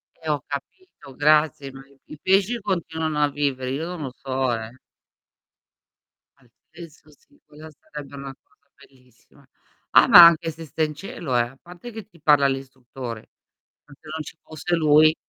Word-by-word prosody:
Eh, 160 Hz, -1 st, -8 dB
ho 145 Hz, -3 st, 0 dB
capito, 140 Hz, -, -9 dB
grazie, 150 Hz, -2 st, +2 dB
ma 135 Hz, 0 st, -12 dB
i 140 Hz, -1 st, -24 dB, 0.2 s
i 150 Hz, -, -12 dB
pesci 195 Hz, +5 st, +2 dB
continuano 160 Hz, -6 st, -2 dB
a 145 Hz, -, +3 dB
vivere, 135 Hz, -3 st, -2 dB
io 150 Hz, +5 st, -3 dB
non 175 Hz, -3 st, -6 dB
lo 130 Hz, -, -5 dB
so, 130 Hz, -2 st, -2 dB
eh. 115 Hz, +2 st, -6 dB, 1.6 s
Altezza 155 Hz, +6 st, -16 dB
sì, 285 Hz, -, -26 dB
quella 155 Hz, +1 st, -13 dB
sarebbe 145 Hz, -2 st, -11 dB
una 140 Hz, -1 st, -8 dB
cosa 140 Hz, -, -37 dB
bellissima. 130 Hz, -4 st, -24 dB, 0.4 s
Ah, -, -, +6 dB
ma 175 Hz, -1 st, +11 dB
anche 165 Hz, 0 st, +4 dB
se 165 Hz, +1 st, -10 dB
stai 155 Hz, +2 st, -1 dB
in 150 Hz, -, -8 dB
cielo, 150 Hz, -5 st, -5 dB
eh, -, -, +4 dB
a 120 Hz, +3 st, -6 dB
parte 180 Hz, +7 st, -12 dB
che 220 Hz, -1 st, -9 dB
ti 170 Hz, -7 st, -23 dB
parla 145 Hz, -3 st, +4 dB
l'istruttore, 130 Hz, -3 st, -7 dB, 0.6 s
se 145 Hz, -, -17 dB, 0.2 s
non 160 Hz, -, -4 dB
ci 160 Hz, -, -10 dB
fosse 160 Hz, +3 st, -3 dB
lui. 155 Hz, 0 st, +5 dB
150 Hz, 165 wpm, -23 LUFS, 135-165 Hz, 1.6 s, ma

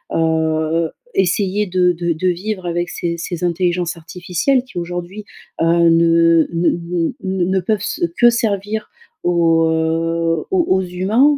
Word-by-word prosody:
heu, 160 Hz, 0 st, 0 dB, 0.2 s
essayer 195 Hz, +2 st, +1 dB
de 180 Hz, 0 st, +2 dB
de 170 Hz, 0 st, -1 dB
de 165 Hz, +4 st, -2 dB
vivre 185 Hz, +2 st, -3 dB
avec 175 Hz, 0 st, -2 dB
ces 170 Hz, 0 st, -3 dB
ces 170 Hz, +1 st, -5 dB
intelligences 175 Hz, 0 st, 0 dB
artificielles 180 Hz, -, -1 dB
qui 250 Hz, -9 st, -7 dB
aujourd'hui, 175 Hz, +4 st, -6 dB, 0.4 s
heu, -, -, +3 dB
ne 165 Hz, -1 st, +4 dB
ne 170 Hz, +1 st, +2 dB, 0.5 s
ne 190 Hz, -1 st, -1 dB
ne 190 Hz, +1 st, +1 dB
peuvent 200 Hz, +3 st, -1 dB
se -, -, -3 dB, 0.2 s
que 240 Hz, 0 st, +7 dB
servir 215 Hz, -2 st, -2 dB, 0.3 s
aux 165 Hz, -2 st, +3 dB
heu, 165 Hz, 0 st, 0 dB
aux 365 Hz, -3 st, +2 dB
aux 190 Hz, 0 st, +2 dB
humains, 200 Hz, +11 st, +2 dB
175 Hz, 140 wpm, -18 LUFS, 165-190 Hz, 0.5 s, que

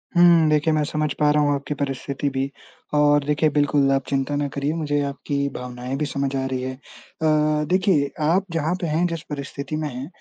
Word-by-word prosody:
हुँ, 170 Hz, -2 st, +6 dB
देखिए 155 Hz, +1 st, +2 dB
मैं 155 Hz, -, +2 dB
समझ 155 Hz, 0 st, -1 dB
पा 150 Hz, -1 st, +4 dB
रहा 150 Hz, 0 st, +3 dB
हूँ 145 Hz, 0 st, +2 dB
आपकी 140 Hz, +1 st, -4 dB
परिस्थिति 140 Hz, 0 st, -2 dB
भी 135 Hz, +1 st, -2 dB, 0.4 s
और 145 Hz, -1 st, +4 dB
देखिए 150 Hz, +1 st, +2 dB
बिल्कुल 145 Hz, -1 st, +2 dB
आप 135 Hz, -1 st, +1 dB
चिंता 135 Hz, +1 st, 0 dB
ना 145 Hz, 0 st, 0 dB
करिए, 140 Hz, +2 st, -2 dB
मुझे 145 Hz, -3 st, -1 dB
आपकी 140 Hz, 0 st, -2 dB
भावनाएँ 125 Hz, +1 st, -5 dB
भी 150 Hz, -, -1 dB
समझ 140 Hz, -1 st, -2 dB
आ 135 Hz, 0 st, -1 dB
रही 130 Hz, -1 st, -2 dB
है 130 Hz, 0 st, -3 dB
अ, -, -, -21 dB, 0.9 s
देखिए 180 Hz, -6 st, +2 dB, 0.2 s
आप 190 Hz, +3 st, +2 dB
जहाँ 165 Hz, +1 st, 0 dB
पे 170 Hz, -, -1 dB
हैं, 160 Hz, +3 st, +1 dB
जिस 165 Hz, -2 st, -4 dB
परिस्थिति 140 Hz, 0 st, -5 dB
में 155 Hz, 0 st, -2 dB
हैं 130 Hz, +2 st, -6 dB
145 Hz, 205 wpm, -23 LUFS, 140-155 Hz, 0.9 s, हुँ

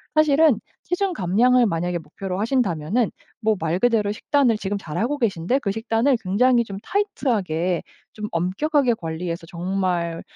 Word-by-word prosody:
사실은 310 Hz, -5 st, +4 dB, 0.2 s
체중 370 Hz, +2 st, -1 dB
감량을 240 Hz, -, +3 dB
만약에 175 Hz, -2 st, -1 dB
목표로 180 Hz, +4 st, -6 dB
하신다면은 215 Hz, -, +1 dB, 0.3 s
뭐 220 Hz, 0 st, +2 dB
말 165 Hz, +3 st, -1 dB
그대로 225 Hz, -3 st, +2 dB
식단을 245 Hz, +1 st, +2 dB
지금 205 Hz, 0 st, -3 dB
잘하고 225 Hz, -, -2 dB
계신데 225 Hz, +1 st, 0 dB
그 200 Hz, -, -2 dB
식단을 225 Hz, +4 st, +1 dB
굉장히 235 Hz, +5 st, +3 dB
좀 195 Hz, -2 st, -7 dB
타이트하게 205 Hz, -, -1 dB, 0.3 s
좀 210 Hz, -1 st, -5 dB
엄격하게 240 Hz, -, +1 dB
관리해서 165 Hz, -1 st, -5 dB
정말 175 Hz, -2 st, -2 dB
210 Hz, 340 characters per minute, -23 LUFS, 175-250 Hz, 0.3 s, 사실은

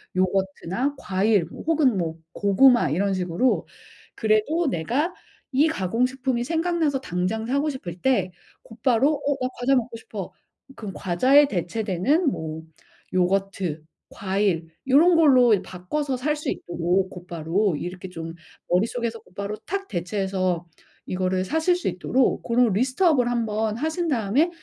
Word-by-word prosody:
요거트나 190 Hz, +7 st, -1 dB
과일 195 Hz, -1 st, +1 dB
뭐 165 Hz, -, -10 dB
혹은 300 Hz, -9 st, +2 dB
뭐 165 Hz, -2 st, -2 dB, 0.2 s
고구마 205 Hz, -, +4 dB
이런 195 Hz, +5 st, +1 dB
식으로 180 Hz, +7 st, 0 dB, 0.5 s
그래도 225 Hz, +10 st, +1 dB
내가 255 Hz, -, -1 dB, 0.4 s
이 280 Hz, +4 st, +4 dB
가공식품이 250 Hz, -, -1 dB
생각나서 325 Hz, -3 st, 0 dB
당장 185 Hz, +2 st, -2 dB
사고 280 Hz, +4 st, +1 dB
싶을 180 Hz, -, -7 dB
때 200 Hz, -9 st, +1 dB, 0.3 s
곧바로 245 Hz, +5 st, +1 dB
"어 285 Hz, -1 st, -1 dB
나 255 Hz, -, 0 dB
과자 270 Hz, +2 st, +3 dB
먹고 240 Hz, -2 st, -1 dB
싶어." 210 Hz, -4 st, -7 dB, 0.4 s
그럼 205 Hz, -4 st, -7 dB
과자에 260 Hz, +11 st, +4 dB
대체되는 215 Hz, -, 0 dB
뭐 160 Hz, 0 st, -5 dB, 0.5 s
요거트 185 Hz, -3 st, 0 dB, 0.3 s
과일 190 Hz, -4 st, -1 dB, 0.2 s
요런 325 Hz, +7 st, +6 dB
걸로 255 Hz, -8 st, +6 dB
바꿔서 260 Hz, +11 st, -3 dB
살 300 Hz, +4 st, 0 dB
수 295 Hz, -, -4 dB
있도록 175 Hz, +2 st, -1 dB
곧바로 175 Hz, +1 st, -1 dB
이렇게 180 Hz, +3 st, -6 dB
좀 165 Hz, -2 st, -7 dB, 0.4 s
머릿속에서 230 Hz, +5 st, 0 dB
곧바로 200 Hz, 0 st, -6 dB
탁 395 Hz, +2 st, -3 dB
대체해서 185 Hz, -1 st, -1 dB, 0.4 s
이거를 185 Hz, 0 st, -1 dB
사실 320 Hz, -, +2 dB
수 360 Hz, -, -4 dB
있도록 260 Hz, -1 st, +1 dB
고런 240 Hz, 0 st, +3 dB
list 255 Hz, -, 0 dB
up을 265 Hz, -8 st, +4 dB
한번 220 Hz, -2 st, -1 dB
하신 320 Hz, +5 st, -1 dB
다음에 250 Hz, -, +2 dB
220 Hz, 300 characters per minute, -24 LUFS, 185-270 Hz, 0.5 s, 요런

